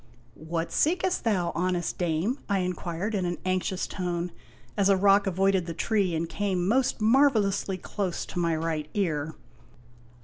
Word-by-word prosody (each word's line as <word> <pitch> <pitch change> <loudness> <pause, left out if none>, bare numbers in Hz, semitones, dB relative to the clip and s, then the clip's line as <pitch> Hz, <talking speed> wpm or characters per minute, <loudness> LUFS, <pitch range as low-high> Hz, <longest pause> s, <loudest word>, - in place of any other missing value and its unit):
" 120 - -30 0.2
What 165 -1 -1
seekst 360 +3 +1
thou, 180 -6 +1
honest 180 -1 -1
dame? 175 - 0
' - - -29
I 200 - +2
inquired 180 +2 -3
in 195 -3 0
an 175 0 -2
anxious 185 0 0
tone, 175 -2 -3 0.4
as 200 -1 +3
a 195 - +5
rock 200 +1 +4
avoided 190 -1 +2
the 165 - -4
tree 195 -3 +1
and 165 +1 -1
came 185 0 -1
most 245 +1 +1
marvelously 215 -6 +3
close 185 0 -3
to 180 - -5
my 170 -2 +1
right 155 -1 -2
ear. 160 -6 -1
185 Hz, 165 wpm, -27 LUFS, 170-205 Hz, 0.4 s, a